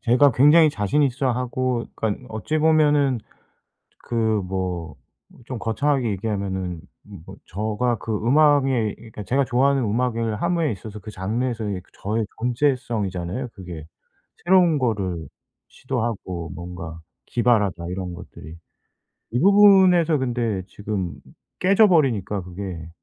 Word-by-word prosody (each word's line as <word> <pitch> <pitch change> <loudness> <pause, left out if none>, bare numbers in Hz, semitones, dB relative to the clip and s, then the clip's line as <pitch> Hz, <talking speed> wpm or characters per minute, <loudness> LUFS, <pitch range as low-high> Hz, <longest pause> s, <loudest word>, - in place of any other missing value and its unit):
제가 130 +3 +4
굉장히 150 +5 +6
자신 105 +5 0
있어 135 -1 +1
하고 125 0 -1
그러니까 110 +3 -3
어찌 110 +9 -2
보면은 150 -4 +3 0.9
그 120 - -6 0.3
뭐 90 -4 -4 0.5
좀 125 -1 -6
거창하게 130 +3 0
얘기하면은 95 -4 -3 0.2
뭐 100 -6 -12
저가 110 +4 -1
그 110 - -5
음악에 135 -2 +3
그니까 110 -2 -10
제가 135 +8 +1
좋아하는 135 +3 +2
음악을 115 -1 -1
함에 170 -3 +1
있어서 105 +1 -7
그 105 - -9
장르에서의 110 0 -3
그 - - -25
저의 110 +3 -1
존재성이잖아요 120 -5 -1
그게. 85 -5 -9 0.6
새로운 175 -3 +4
거를 100 - -2 0.4
시도하고 110 -10 -4
뭔가 85 -2 -8 0.3
기발하다 105 -8 +1
이런 90 -1 -4
것들이. 80 -2 -11 0.8
이 120 - +1
부분에서 190 -4 +6
근데 120 -6 -1
지금 100 -2 -4 0.4
깨져 200 +3 +5
버리니까 115 - +1
그게. 90 -2 -7
115 Hz, 290 characters per minute, -23 LUFS, 95-135 Hz, 0.9 s, 굉장히